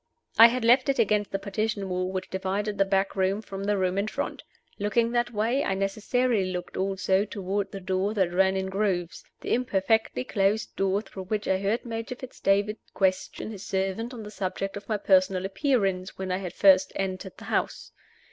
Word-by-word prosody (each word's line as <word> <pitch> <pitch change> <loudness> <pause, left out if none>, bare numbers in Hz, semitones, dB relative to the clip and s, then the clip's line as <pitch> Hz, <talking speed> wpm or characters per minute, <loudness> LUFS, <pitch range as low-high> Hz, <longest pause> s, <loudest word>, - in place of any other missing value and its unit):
I 230 - +12
had 240 0 -1
left 255 +4 +5
it 275 - +2
against 210 -3 +2
the 195 - -1
partition 200 0 -2
wall 185 0 -2
which 185 -1 -4
divided 195 +2 -2
the 195 - +5
back 195 0 0
room 190 +1 +1
from 195 -2 -6
the 205 0 +1
room 185 0 +1
in 200 - -1
front. - - -4 0.4
Looking 230 +3 +1
that 240 0 0
way, 235 +6 +1
I 195 - 0
necessarily 205 +1 0
looked 180 -1 -5
also 190 0 +1
toward 195 -1 -3
the 195 - -6
door 190 +3 -1
that 185 -4 +1
ran 190 +1 +3
in 190 - -1
grooves 190 -4 -1 0.2
the - - -1
imperfectly 220 - +1
closed 200 +7 0
door 195 +2 +1
through 190 -3 -9
which 210 +2 -2
I 190 - +2
heard 205 +5 -1
Major 230 +1 -4
Fitz 255 0 -11
David 200 +2 +2 0.2
question 190 +2 0
his 200 -3 -8
servant 195 +5 -2
on 235 -4 -7
the 210 - -8
subject 195 -1 -3
of 205 +1 -9
my 215 - +1
personal 190 -1 +3
appearance 195 -3 0
when 190 -1 -4
I 185 0 -2
first 190 +1 +5
entered 190 0 -4
the - - -11
house. - - -2
195 Hz, 195 wpm, -27 LUFS, 190-215 Hz, 0.4 s, I